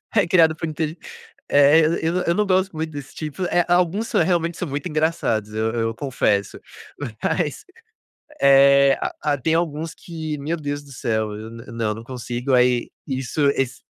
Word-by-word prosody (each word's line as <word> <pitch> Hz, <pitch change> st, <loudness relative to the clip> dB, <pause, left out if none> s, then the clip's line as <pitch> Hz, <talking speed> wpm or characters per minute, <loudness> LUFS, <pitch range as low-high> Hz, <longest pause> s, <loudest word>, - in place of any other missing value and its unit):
é 205 Hz, -5 st, +3 dB
criado 165 Hz, -2 st, +4 dB
por 165 Hz, -, -4 dB
inteli 155 Hz, +1 st, -3 dB, 0.5 s
eh, 145 Hz, +3 st, +6 dB, 0.2 s
eu 165 Hz, +2 st, 0 dB
eu 170 Hz, -, +2 dB
não 210 Hz, +3 st, +1 dB
gosto 190 Hz, -1 st, +1 dB
muito 160 Hz, 0 st, -3 dB
desse 145 Hz, -3 st, -9 dB
tipo, 155 Hz, +3 st, -6 dB
eh, 175 Hz, 0 st, +3 dB
alguns 180 Hz, +5 st, +2 dB
são -, -, +2 dB
realmente 170 Hz, -1 st, 0 dB
são 180 Hz, -, -3 dB
muito 145 Hz, +6 st, -4 dB
engraçados, 155 Hz, -9 st, 0 dB
eu 110 Hz, +1 st, 0 dB
eu 115 Hz, -1 st, -1 dB
confesso, 110 Hz, -6 st, -1 dB, 0.6 s
mas, 155 Hz, -6 st, -1 dB, 0.8 s
eh 140 Hz, 0 st, +6 dB, 0.3 s
ah 150 Hz, -1 st, +1 dB
tem 160 Hz, +5 st, 0 dB
alguns 165 Hz, -1 st, -2 dB
que 160 Hz, -3 st, -6 dB
meu 150 Hz, +4 st, -2 dB
Deus 145 Hz, -2 st, -4 dB
do 140 Hz, -1 st, -14 dB
céu, 110 Hz, -4 st, -2 dB
eu 110 Hz, +2 st, -8 dB
nã 115 Hz, 0 st, -10 dB
não 115 Hz, -2 st, -1 dB
não 115 Hz, +2 st, -9 dB
consigo, 125 Hz, +1 st, -4 dB
aí 125 Hz, -1 st, +3 dB, 0.2 s
isso 135 Hz, +1 st, -3 dB
esse 135 Hz, -1 st, -2 dB
145 Hz, 170 wpm, -22 LUFS, 125-165 Hz, 0.8 s, eh